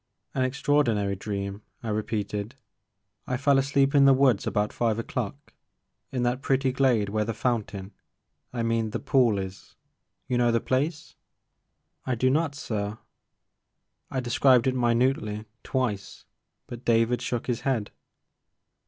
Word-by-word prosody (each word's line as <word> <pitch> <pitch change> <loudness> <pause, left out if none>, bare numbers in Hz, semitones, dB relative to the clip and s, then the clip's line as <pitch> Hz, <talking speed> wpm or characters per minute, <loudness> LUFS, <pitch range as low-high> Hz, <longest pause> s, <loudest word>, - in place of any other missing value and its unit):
An 130 - -1
extraordinary 130 -7 +1
dream," 100 0 -4 0.2
I 115 - -3
repeated; 105 +1 -2 0.7
I 125 - -1
fell 140 0 +4
asleep 140 0 +2
in 140 -1 +6
the 135 -1 +7
woods 130 -5 +3
about 105 0 0
five 115 -2 0
o'clock, 115 - -5 0.6
in 125 -2 -1
that 120 +1 +1
^ - - -22
pretty 135 -1 +1
glade 125 -6 +2
where 105 +1 0
the 110 +1 -3
fountain 105 -5 -2 0.3
— - - -51
I 120 -2 -2
mean 115 -1 0
the - - -3
pool 120 -6 +3
is. 95 0 -7 0.5
You 125 - 0
know 120 -1 +4
the 115 - +2
place? 145 +6 -2 0.3
' - - -52
' - - -48
I 130 - +1
"I - - 0
do 130 +3 +2
not 150 0 +1
sir." 105 -5 -3 1.1
I 130 - -2
described 125 0 +4
it 130 - +2
minutely, 120 -3 +1 0.2
twice, 110 -8 -3 0.4
but 120 0 -9
David 115 +1 +2
shook 120 -2 -2
his 120 -3 -2
head. 120 -7 -1
120 Hz, 155 wpm, -26 LUFS, 105-130 Hz, 1.1 s, the